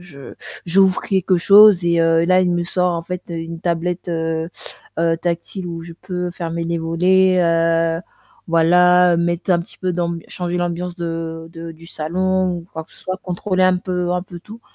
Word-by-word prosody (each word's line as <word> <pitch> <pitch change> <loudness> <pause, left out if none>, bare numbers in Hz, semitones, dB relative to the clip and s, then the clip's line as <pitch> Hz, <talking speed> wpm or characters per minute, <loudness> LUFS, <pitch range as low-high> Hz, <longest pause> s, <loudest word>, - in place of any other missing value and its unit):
je 150 -7 -12 0.3
j'ouvre 190 +1 +3
quelque 190 -1 +1
chose 200 0 +6
et, 170 -1 +2
heu, 165 0 +3
là 185 +1 +4
il 180 - +1
me 175 0 0
sort 180 0 0
en 165 - -3
fait 180 +1 -6
une 165 0 -6
tablette, 175 +1 -2
heu, 165 0 -2 0.5
heu, 165 0 +2
tactile 175 +2 -4
où 165 -1 -6
je 170 - -10
peux 180 0 -5
fermer 170 -1 -4
les 170 0 -2
volets, 180 +3 +3
heu, 165 0 +1 0.5
voilà, 180 +1 +4
mettre 170 +1 -1
un 170 - +2
petit 170 - -12
peu 185 -1 -2
d'amb 170 -1 -2
changer 180 0 -4
l'ambiance 175 0 -3
de 165 -1 -5
de 165 0 -8
du 165 +1 -15
salon 185 +3 -1
ou 170 - -12
quoi 160 -1 -6
que - - -26
ce - - -19
soit, 185 0 -4
contrôler 185 +1 -1
un 185 0 +4
peu 180 -1 -2
un 180 - -1
peu 175 -2 -11
tout. 220 +5 -12
175 Hz, 190 wpm, -19 LUFS, 165-180 Hz, 0.5 s, chose